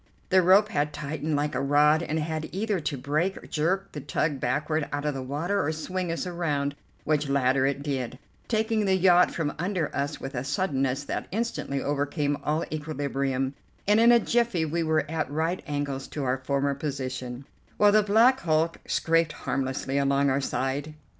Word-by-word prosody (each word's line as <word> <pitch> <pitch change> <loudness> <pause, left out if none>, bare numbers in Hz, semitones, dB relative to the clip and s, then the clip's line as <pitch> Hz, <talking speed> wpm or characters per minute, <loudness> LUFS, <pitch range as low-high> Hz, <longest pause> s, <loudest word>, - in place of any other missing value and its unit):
The 185 0 +5
rope 195 +4 +5
had 150 -7 -1
tightened 150 +1 -3
like 145 +1 0
a 130 - -1
rod, 150 +3 +4
and 160 -2 -2
had 155 0 -3
either 200 +2 -1
to 145 -2 -3
break, 155 +9 -2
jerk 185 +6 0
the 150 - -6
tug 145 +1 -1
backward 150 +4 -1
out 145 +1 -3
of 150 - 0
the 135 - -4
water, 150 +10 -1
or 150 - 0
swing 180 +3 -3
us 165 - -3
around, 150 -6 -1 0.3
which 150 -2 0
latter 135 -1 +3
it 140 0 -2
did, 130 -4 -3 0.3
taking 220 -1 +1
the 190 -1 +3
yacht 180 -1 +5
from 155 -3 -2
under 180 -2 -1
us 140 +1 -2
with 135 - -6
a 125 -1 -2
suddenness 135 -3 0
that - - -4
instantly 200 - -2
overcame 145 0 0
all 155 +2 0
equilibrium, 140 -3 -2 0.3
and 210 +2 +5
in 235 +1 +7
a 240 - +8
jiffy 230 -7 +1
we 165 +2 -1
were 160 -2 +1
at 160 +1 -2
right 160 +5 -1
angles 145 -2 -3
to 145 - -5
our 130 0 0
former 140 +1 0
position, 130 -3 -5 0.3
while 205 0 +6
the 215 +1 +5
black 225 +6 +4
hulk 160 -2 +1
scraped 165 -1 +2
harmlessly 135 +1 -2
along 140 0 +2
our 135 +1 +1
side. 140 +3 -2
150 Hz, 180 wpm, -27 LUFS, 140-175 Hz, 0.3 s, a